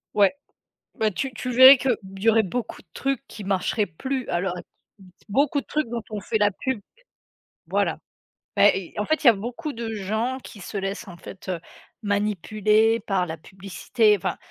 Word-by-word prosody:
Ouais, 200 -2 +5 0.6
bah, 220 -4 +1
tu 260 +8 -3
tu 250 +3 -5
verrais 260 +2 +10
qu'il 250 0 +1 0.2
y 215 +4 +1
aurait 225 0 +5
beaucoup 220 +4 -4
de 185 - -43
trucs 275 -2 -2
qui 210 - -9
marcheraient 195 +2 0
plus 260 - -4
à 175 - 0
l'heure 180 -1 -2
ac 175 - -8 0.6
beaucoup 280 +6 +2
de - - -17
trucs 305 -4 -1
dont 235 0 -4
on 210 -1 -4
fait 220 +3 -1
la 205 -1 +4
pub 255 +4 -3 0.9
voilà. - - 0 0.6
Beh - - +6 0.2
et - - -6
en 210 - 0
fait, 315 +5 0
il - - +5
y - - +12
a - - +6
beaucoup 240 +9 -5
de 230 -3 -5
gens 220 +5 -2
qui 210 - -11
se 195 - -6
laissent 195 +3 -4
en 175 -2 -10
fait, 190 +3 -11
heu, 180 -2 -2 0.4
manipuler 210 +2 +2
par 195 -4 0
la 160 -1 -6
publicité 195 +5 0
enfin, 175 - -3
215 Hz, 195 wpm, -24 LUFS, 195-245 Hz, 0.9 s, y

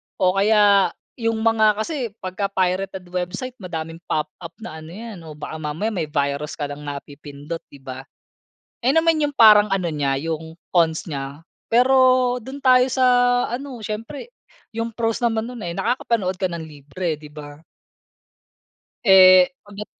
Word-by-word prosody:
o - - 0
kaya 205 -1 +4 0.2
'yong 225 -1 0
mga 220 -1 +3
kasi 250 -8 -4
pagka 185 +2 -2
pirated 190 0 -1
website, 185 +9 -4
madaming 165 -3 -6
pop-up 155 +3 -4
na 160 -8 -7
ano 155 - -11
'yan 220 -3 -8
o 155 - -9
baka 155 +1 -7
mamaya 155 +8 -3
may 175 -7 -3
virus 145 0 -2
ka 150 - -5
ng 145 - -7
napipindot, 145 +2 -8
'di 140 -1 -16
ba? 130 0 -8 0.7
Ayun 255 +3 +1
naman 330 -1 +3
'yong 290 - -6
parang 215 -4 +7
ano 180 -3 -1
niya, 145 -3 0
'yong 160 0 -4 0.2
cons 165 -3 +2
niya. 140 +1 -6 0.2
Pero 255 0 +4
do'n 265 +4 -9
tayo 255 -1 +5
sa 260 0 -1 0.5
ano, 250 -1 -6
siyempre 230 - -6 0.4
'yong 230 0 -2
pros 225 0 -1
naman 225 -1 0
no'n, 245 -2 -8
eh, 170 - -5
nakakapanood 230 -6 0
ka 190 - 0
ng 170 -1 -5
libre, 155 +3 -4
'di 150 -1 -13
ba? 150 0 -11 1.4
Eh, 185 +1 +7
o 205 - -18
bet 205 +1 -7
190 Hz, 155 wpm, -22 LUFS, 155-230 Hz, 1.4 s, parang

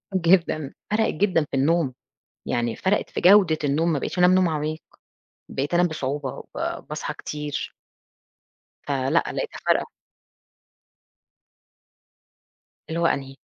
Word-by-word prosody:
جدًا، 165 -5 +2 0.2
فرقت 220 +1 +2
جدًا 180 -3 +2
في 135 - -1
النوم. 145 0 +2 0.5
يعني 120 -1 -1
فرقت 195 +2 0
في - - -4
جودة 185 -4 +6
النوم 155 +4 +1
ما 145 - 0
بقيتش - - -4
أنام 180 +1 +6
نوم 185 -2 +3
عميق. 155 0 -2 0.7
بقيت 140 +5 -3
أنام 175 0 +4
بصعوبة 145 -3 -3 0.2
وب - - -4
باصحى - - -4
كتير. 150 -1 -5 1.2
فلأ 135 -2 0 0.2
لقيتها - - -4
فارقة. - - +2 3.0
اللي 165 +1 -2
هو 170 - +1
أنهي؟ 135 -3 -2
155 Hz, 120 wpm, -24 LUFS, 140-180 Hz, 3.0 s, جودة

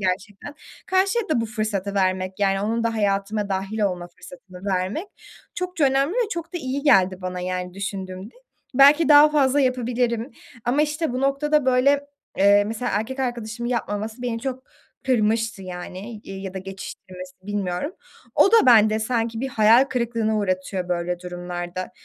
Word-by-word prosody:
gerçekten. 195 +8 -3 0.3
Karşıya 390 +4 +1
da 285 -7 +1
bu 230 - -2
fırsatı 215 -3 -3
vermek, 185 -1 0
yani, 195 -1 +1
onun 230 +3 -1
da 230 0 0
hayatıma 205 0 0
dâhil 195 +3 -3
olma 180 -4 -1
fırsatını 180 +1 -14
vermek 190 - -2 0.5
çokça 360 -4 -1
önemli 275 +4 +2
ve 475 -2 0
çok 335 0 -5
da 350 - -1
iyi 270 0 -3
geldi 190 -9 +4
bana, 180 0 -4
yani, 180 0 -4
düşündüğümde. 195 +1 -6 0.4
Belki 285 +4 +6
daha 295 0 +8
fazla 285 -2 +2
yapabilirim. 245 -1 0 0.3
Ama, 270 +5 +2
işte, 300 -2 -1
bu 255 - -2
noktada 280 +1 +1
böyle, 260 +3 +4 0.4
eee, 200 +1 +5
mesela 225 +3 -3
erkek 255 +6 -2
arkadaşımın 240 -2 -3
yapmaması 220 0 -3
beni 230 -2 -2
çok 260 0 -5 0.4
kırmıştı 225 -3 +1
yani. 185 +4 -7
İii, 195 0 -8
ya 190 -1 -6
da 190 - -3
geçiştirmesi, 185 -1 -9
bilmiyorum. 200 - -3 0.4
O 395 - +5
da 455 -8 +6
bende 220 -3 +6
sanki 225 0 -1
bir 265 - -2
hayal 225 +2 +5
kırıklığına 230 -4 -1
uğratıyor 185 -2 -2
böyle 175 0 -2
durumlarda. 175 0 -6
220 Hz, 155 wpm, -23 LUFS, 190-260 Hz, 0.5 s, daha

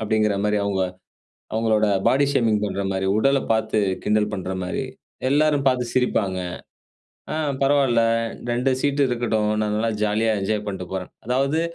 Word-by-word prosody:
அப்டிங்கிற 110 -1 +1
மாரி 105 0 +1
அவங்க 100 -2 0 0.7
அவங்களோட 110 -1 +2 0.2
பாடி 140 +2 +4
ஷேமிங் 110 -5 +2
பண்ற 100 -1 -2
மாரி, 95 0 -1
உடல 135 +5 +3
பார்த்து 110 -1 +1 0.3
கிண்டல் 105 0 +1
பண்ற 95 -2 -4
மாரி 90 +8 -3 0.4
எல்லாரும் 145 0 +3
பார்த்து 125 -2 +2
சிரிப்பாங்க. 100 -7 +1 0.9
ஆ - - -2 0.3
பரவால்ல 135 -4 +3 0.5
2 125 +3 +1
சீட் 145 +1 0
இருக்கட்டும். 115 -4 0
நான் 105 -1 0
நல்லா 115 +1 0
ஜாலியா 110 +2 +1
என்ஜாய் 105 +1 -1
பண்ட்டு 95 -3 -4
போறேன். 95 -1 -4
அதாவது 135 +6 +1
110 Hz, 145 wpm, -23 LUFS, 105-130 Hz, 0.9 s, பாடி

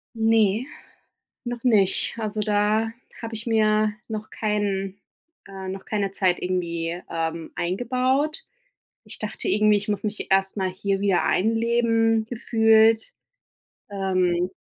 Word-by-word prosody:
Ne, 225 0 +2 0.8
noch 240 -1 -5
nicht. 210 -6 +3
Also, 215 -1 -3
da 210 +1 +1 0.3
habe 230 -1 -6
ich 220 +1 -5
mir 215 -1 +2
noch 215 -1 -5
keinen 200 -2 -2 0.5
äh, 190 -1 -7
noch 190 +1 -6
keine 200 -2 -2
Zeit 185 -3 +1
irgendwie, 170 -2 -2
ähm, 165 0 -3
eingebaut. 255 - 0 0.7
Ich - - -3
dachte - - -2
irgendwie, 215 - +4
ich 205 - -6
muss 205 0 -2
mich 210 0 -4
erstmal 195 0 +1
hier 195 +1 -2
wieder 195 -3 +2
einleben, 225 +1 +2
gefühlt. 225 -1 +3 0.8
Ähm 185 -2 0
210 Hz, 120 wpm, -24 LUFS, 190-225 Hz, 0.8 s, irgendwie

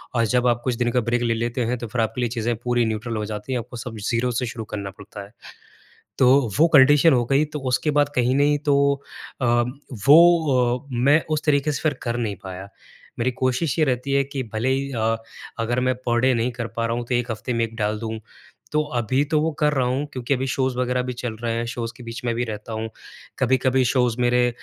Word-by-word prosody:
और 115 -1 +3
जब 125 0 +3
आप 120 -1 +1
कुछ 125 -2 0
दिन 120 0 0
का 125 - +2
ब्रेक 120 0 +1
ले 120 -1 +1
लेते 120 +2 -2
हैं 125 +2 -1
तो 120 - -6
फिर 120 +1 -1
आपके 115 +3 -2
लिए 120 - 0
चीज़ें 120 0 -1
पूरी 120 +1 0
न्यूट्रल 110 +1 -3
हो 105 - -2
जाती 105 +3 -6
हैं। 125 - 0
आपको 120 +1 -8
सब 115 -1 -7
ज़ीरो 120 +1 0
से 125 - -1
शुरू 115 -1 -6
करना 100 -2 -5
पड़ता 105 0 -9
है। 100 - -18 0.9
तो 125 -1 +5 0.3
वो 165 +2 +6
कंडीशन 145 +4 +6
हो 120 -2 +3
गई 140 +2 +4
तो - - -1
उसके 150 - +1
बाद 145 0 +2
कहीं 125 +1 +2
नहीं 145 +1 +3
तो 140 - +4 0.6
अ, - - 0 0.6
वो 145 -6 +5
अ 140 - -21
मैं 140 +6 +3
उस 155 -1 0
तरीके 150 0 +2
से - - -4
फिर 155 -2 +1
कर 120 0 -2
नहीं 110 -4 -2
पाया। 95 +1 -7 0.5
मेरी 120 +2 +1
कोशिश 130 +5 0
ये 155 - +5
रहती 130 0 -1
है 140 0 +3
कि 135 0 -4
भले 110 +4 -1
ही 135 +1 0
अ 115 0 +1 0.4
अगर 120 +2 0
मैं 130 0 +1
पर 120 0 +2
डे 130 +1 +3
नहीं 115 +1 0
कर 120 -1 -4
पा 115 - 0
रहा 115 0 -1
हूँ 120 - -3
तो 125 - -2
1 120 0 -1
हफ्ते 115 +3 -3
में 115 -1 +1
एक 115 0 -7
डाल 105 -1 -1
दूँ। 110 -1 -4 0.5
तो 150 0 +2 0.2
अभी 130 +4 +1
तो 155 - +3
वो 160 +1 +1
कर 150 -1 +3
रहा 130 -3 +1
हूँ 130 +4 -1
क्योंकि 130 +2 -1
अभी 130 0 -2
शोज़ 130 0 -1
वग़ैरह 125 0 0
भी 125 0 -4
चल 120 -2 -5
रहे 115 -1 -1
हैं 115 - -1
शोज़ 115 -1 -4
के 125 - -12
बीच 115 0 -7
में 120 -1 0
भी 120 +1 -1
रहता 110 -1 -7
हूँ। 110 0 -3 0.5
कभी-कभी 130 0 +2
शोज़ 125 -1 +1
मेरे 120 0 +3
125 Hz, 245 wpm, -23 LUFS, 115-130 Hz, 0.9 s, वो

